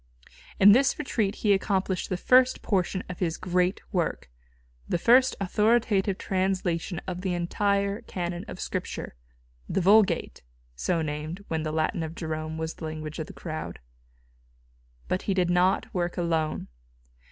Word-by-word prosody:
In 200 +2 +9
this 270 +5 +4
retreat 220 -8 -1
he 205 - +6
accomplished 190 -1 0
the 185 - -1
first 255 +6 +4
portion 190 -1 0
of 180 - -7
his 170 -3 -1
great 180 +1 0
work, 170 - -1 0.6
the - - +1
first 255 +7 +5
authoritative 205 -1 +2
translation 185 -2 -1
of 180 -1 -4
the 185 -2 -1
entire 200 +4 0
Canon 175 -5 -4
of - - -8
Scripture - - -4 0.6
the 195 - +1
Vulgate 200 +3 +3 0.3
so 165 - 0
named 155 +6 -5
when 160 -1 -1
the 155 0 -2
Latin 160 +2 0
of 160 0 -5
Jerome 155 -1 -4
was 160 0 -3
the 160 - -8
language 155 0 -6
of 160 - -4
the - - -10
crowd. 155 -2 -6 1.3
But 185 - -1
he 195 - +2
did 180 -2 +2
not 180 +2 +2
work 175 -1 -2
alone. 165 -3 -1
180 Hz, 150 wpm, -27 LUFS, 165-200 Hz, 1.3 s, In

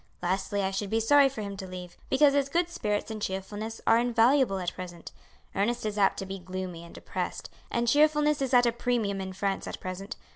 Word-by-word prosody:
Lastly 195 +2 0
I 190 - 0
should 195 +1 -3
be 225 - +1
sorry 275 +5 +5
for 235 -5 -6
him 200 -1 -5
to 190 - -6
leave, 180 -1 -8
because 280 +1 +5
his 280 -1 +1
good 345 +3 +1
spirits 210 -7 -2
and 215 -1 -5
cheerfulness 205 +4 -4
are 225 +1 +5
invaluable 240 -1 +3
at 180 -2 -2
present. 175 -2 -8 0.4
Ernest 235 +4 0
is 210 -1 -2
apt 200 -2 +3
to 195 - -4
be 195 0 -6
gloomy 185 -2 -6
and 170 - -13
depressed, - - -5 0.2
and 235 0 0
cheerfulness 300 +2 +4
is 265 -2 -1
at 245 -1 +6
a 235 - +3
premium 230 -5 -1
in 190 0 -5
France 195 +1 -2
at - - -6
present. 195 +5 -6
210 Hz, 215 wpm, -28 LUFS, 190-245 Hz, 0.4 s, at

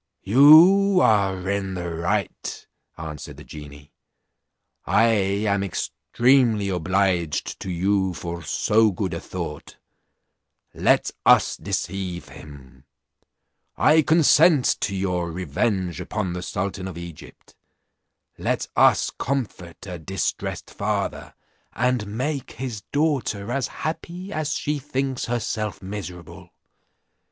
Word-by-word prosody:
"You 170 - +7
are 95 - +2
in 100 -1 -2
the 90 -1 -4
right," 85 +4 -3 0.3
answered 75 -3 -8
the - - -11
genie; 75 -1 -12 0.9
"I 115 - +3 0.4
am 100 -1 +1
extremely 115 +3 +1
obliged 90 -3 0
to 95 - -6
you 95 +1 0
for 85 0 -6
so 110 +7 +2
good 95 -2 -3
a 85 - -3
thought; 85 -5 -7 1.0
let - - +2
us - - +5
deceive 90 -1 -4
him. 70 -3 -14 0.9
I 155 +1 +5
consent 155 -2 +5
to 100 - -2
your 90 -3 -1
revenge 90 - -2
upon 100 -4 -3
the 90 - -4
sultan 95 +1 -4
of 90 -3 -8
Egypt; 85 -2 -11 0.8
let - - -1
us - - +4
comfort 110 -11 -4
a 90 -3 -7
distressed 90 +1 -3
father, - - -3 0.4
and 120 -2 0
make 130 +6 -3
his 120 -4 -5
daughter 135 -8 0
as 135 -1 -1
happy 175 +4 -6
as 155 -1 -2
she 150 0 -2
thinks 135 -1 -2
herself 110 -3 -3
miserable. 90 -4 -8
100 Hz, 110 wpm, -23 LUFS, 90-125 Hz, 1.0 s, You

